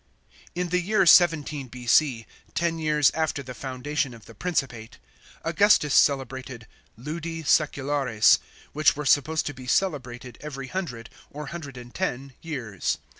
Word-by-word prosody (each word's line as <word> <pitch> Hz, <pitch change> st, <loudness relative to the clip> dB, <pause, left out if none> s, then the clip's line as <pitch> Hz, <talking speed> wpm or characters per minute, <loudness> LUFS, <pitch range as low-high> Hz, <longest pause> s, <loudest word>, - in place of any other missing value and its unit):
In 180 Hz, 0 st, -2 dB
the 180 Hz, +1 st, +1 dB
year 195 Hz, +1 st, +2 dB
17 155 Hz, -5 st, +4 dB
B.C. 125 Hz, 0 st, +1 dB
— -, -, -31 dB
ten 165 Hz, 0 st, 0 dB
years 150 Hz, -2 st, +3 dB
after 160 Hz, -3 st, -2 dB
the 130 Hz, 0 st, -8 dB
foundation 130 Hz, +1 st, -3 dB
of 115 Hz, -, -16 dB
the -, -, -13 dB
Principate 130 Hz, -10 st, -3 dB, 0.2 s
— -, -, -24 dB
Augustus 170 Hz, -4 st, +4 dB
celebrated 130 Hz, -4 st, +1 dB, 0.3 s
Ludi 160 Hz, +5 st, -5 dB
Sseculares, 140 Hz, -6 st, +3 dB, 0.3 s
which 155 Hz, 0 st, +3 dB
were 150 Hz, +1 st, -5 dB
supposed 150 Hz, +3 st, +2 dB
to 145 Hz, -, -3 dB
be 130 Hz, -1 st, -11 dB
celebrated 125 Hz, -8 st, -2 dB
every 135 Hz, -3 st, -7 dB
hundred 125 Hz, -, -5 dB, 0.2 s
(or 150 Hz, +1 st, -7 dB
hundred 145 Hz, -6 st, -8 dB
and 120 Hz, 0 st, -11 dB
ten) 135 Hz, -7 st, -3 dB
years. 125 Hz, -, -3 dB
145 Hz, 145 wpm, -25 LUFS, 125-160 Hz, 0.3 s, 17